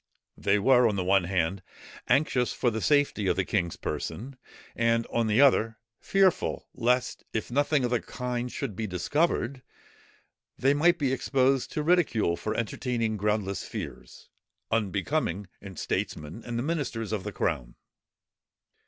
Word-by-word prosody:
They 100 Hz, +1 st, +2 dB
were, 125 Hz, +3 st, +5 dB
on 105 Hz, -, 0 dB
the 95 Hz, -, -1 dB
one 95 Hz, 0 st, +3 dB
hand, 90 Hz, +1 st, 0 dB, 0.5 s
anxious 130 Hz, -4 st, +2 dB
for 120 Hz, -, +1 dB
the 110 Hz, 0 st, -3 dB
safety 145 Hz, -8 st, +2 dB
of -, -, +2 dB
the 95 Hz, -, 0 dB
king's 85 Hz, -5 st, -1 dB
person, 130 Hz, +5 st, -5 dB, 0.4 s
and 115 Hz, 0 st, +2 dB
on 115 Hz, -1 st, +2 dB
the 110 Hz, +3 st, +2 dB
other, 115 Hz, -5 st, +4 dB, 0.2 s
fearful 195 Hz, -2 st, +1 dB
lest, 125 Hz, +1 st, 0 dB
if 110 Hz, +1 st, -3 dB
nothing 145 Hz, 0 st, +2 dB
of 120 Hz, -, -2 dB
the 120 Hz, -, +1 dB
kind 125 Hz, -1 st, -4 dB
should 130 Hz, -8 st, -4 dB
be 110 Hz, +2 st, -3 dB
discovered, 130 Hz, -, 0 dB, 1.0 s
they 135 Hz, +2 st, +3 dB
might 170 Hz, +4 st, +4 dB
be 135 Hz, -4 st, 0 dB
exposed 135 Hz, 0 st, +1 dB
to 150 Hz, -, -1 dB
ridicule 150 Hz, -, +2 dB
for 110 Hz, -, -3 dB
entertaining 115 Hz, 0 st, -1 dB
groundless 105 Hz, -2 st, -1 dB
fears, -, -, -8 dB, 0.4 s
unbecoming 105 Hz, -, 0 dB, 0.2 s
in 95 Hz, -2 st, -9 dB
statesmen 75 Hz, +9 st, -3 dB
and 120 Hz, -1 st, -3 dB
the 120 Hz, -, -1 dB
ministers 135 Hz, -9 st, -2 dB
of 105 Hz, -4 st, -2 dB
the 105 Hz, -, -4 dB
crown. 65 Hz, -11 st, -2 dB
115 Hz, 150 wpm, -28 LUFS, 100-135 Hz, 1.0 s, were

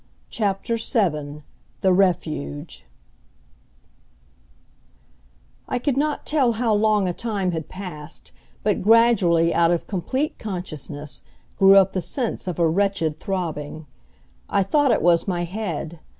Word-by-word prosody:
CHAPTER 205 Hz, +2 st, -1 dB
VII 150 Hz, -, -1 dB, 0.4 s
THE 190 Hz, -1 st, +4 dB
REFUGE 155 Hz, -, -1 dB, 2.8 s
I -, -, 0 dB
could 260 Hz, +2 st, 0 dB
not 295 Hz, +2 st, -1 dB
tell 270 Hz, -6 st, +2 dB
how 225 Hz, 0 st, 0 dB
long 210 Hz, -2 st, +2 dB
a 180 Hz, -, -1 dB
time 200 Hz, -4 st, -2 dB
had 160 Hz, -2 st, -5 dB
passed, 165 Hz, -5 st, -9 dB, 0.3 s
but 210 Hz, -1 st, +1 dB
gradually 195 Hz, -7 st, +4 dB
out 170 Hz, -1 st, +3 dB
of 170 Hz, -1 st, 0 dB
complete 260 Hz, -, -2 dB
consciousness, 155 Hz, -7 st, -6 dB, 0.4 s
grew 195 Hz, 0 st, +7 dB
up 195 Hz, -1 st, +5 dB
the 185 Hz, -, -1 dB
sense 235 Hz, -, -3 dB
of 180 Hz, -, -3 dB
a 170 Hz, -1 st, +3 dB
wretched 165 Hz, -3 st, 0 dB
throbbing. 160 Hz, -5 st, -4 dB, 0.6 s
I 200 Hz, -, +2 dB
thought 290 Hz, +8 st, +2 dB
it 230 Hz, -, +2 dB
was 170 Hz, +1 st, +3 dB
my 175 Hz, -2 st, -1 dB
head. 170 Hz, -4 st, -5 dB
185 Hz, 125 wpm, -23 LUFS, 165-215 Hz, 2.8 s, grew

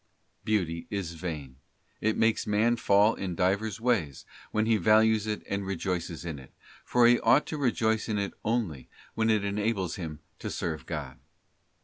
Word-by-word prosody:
Beauty 85 Hz, -6 st, -1 dB
is 100 Hz, -5 st, -3 dB
vain; 75 Hz, -6 st, -6 dB, 0.4 s
it 110 Hz, 0 st, 0 dB
makes 110 Hz, -1 st, +2 dB
man 110 Hz, +3 st, +3 dB
fall 105 Hz, -1 st, +4 dB
in 90 Hz, -3 st, -4 dB
divers 100 Hz, +4 st, 0 dB
ways, 105 Hz, -, 0 dB, 0.2 s
when 110 Hz, 0 st, 0 dB
he 110 Hz, -1 st, +3 dB
values 110 Hz, +2 st, +4 dB
it 105 Hz, -1 st, -3 dB
and 100 Hz, 0 st, -2 dB
rejoices 90 Hz, -3 st, -3 dB
in 80 Hz, -4 st, -5 dB
it, 65 Hz, -, -14 dB, 0.3 s
for 125 Hz, -1 st, +3 dB
he 120 Hz, 0 st, +6 dB
ought 135 Hz, +5 st, +4 dB
to 155 Hz, -, -4 dB
rejoice 110 Hz, -4 st, +1 dB
in 105 Hz, -, 0 dB
it 100 Hz, -1 st, -2 dB
only 105 Hz, -, -2 dB, 0.2 s
when 110 Hz, 0 st, +1 dB
it 105 Hz, -2 st, +2 dB
enables 100 Hz, -3 st, -1 dB
him 80 Hz, -4 st, -6 dB, 0.2 s
to -, -, -4 dB
serve 80 Hz, -6 st, -4 dB
God. -, -, -5 dB
105 Hz, 165 wpm, -28 LUFS, 85-110 Hz, 0.4 s, he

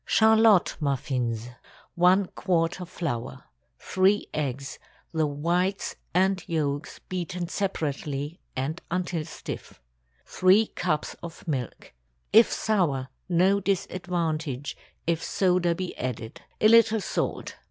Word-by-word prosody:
CHARLOTTE 220 Hz, -3 st, +5 dB
MUFFINS. 125 Hz, -5 st, -1 dB
✠ 125 Hz, -, -15 dB, 0.4 s
1 180 Hz, +3 st, +4 dB
quart 175 Hz, 0 st, 0 dB
of 175 Hz, -, -7 dB
flour. 130 Hz, -8 st, -4 dB, 0.3 s
3 190 Hz, +2 st, +2 dB
eggs—the 140 Hz, +3 st, -3 dB
whites 175 Hz, +7 st, -1 dB, 0.2 s
and 185 Hz, +1 st, +2 dB
yolks 150 Hz, -2 st, -2 dB
beaten 180 Hz, -1 st, -3 dB
separately 150 Hz, -4 st, -3 dB, 0.2 s
and 140 Hz, +6 st, -3 dB
until 175 Hz, -2 st, -1 dB
stiff. -, -, -8 dB, 0.5 s
3 190 Hz, +4 st, +4 dB
cups 155 Hz, -4 st, -1 dB
of 170 Hz, 0 st, -9 dB
milk. 130 Hz, -6 st, -4 dB, 0.4 s
If 225 Hz, +2 st, +7 dB
sour, 155 Hz, -12 st, 0 dB, 0.2 s
no 185 Hz, +3 st, +4 dB
disadvantage, 170 Hz, -7 st, -2 dB, 0.3 s
if 165 Hz, -1 st, 0 dB
soda 180 Hz, -2 st, +2 dB
be 185 Hz, +1 st, -4 dB
added. 120 Hz, -3 st, -5 dB, 0.2 s
A 215 Hz, -, +6 dB
little 225 Hz, 0 st, +6 dB
salt. -, -, -3 dB
170 Hz, 110 wpm, -26 LUFS, 145-185 Hz, 0.5 s, If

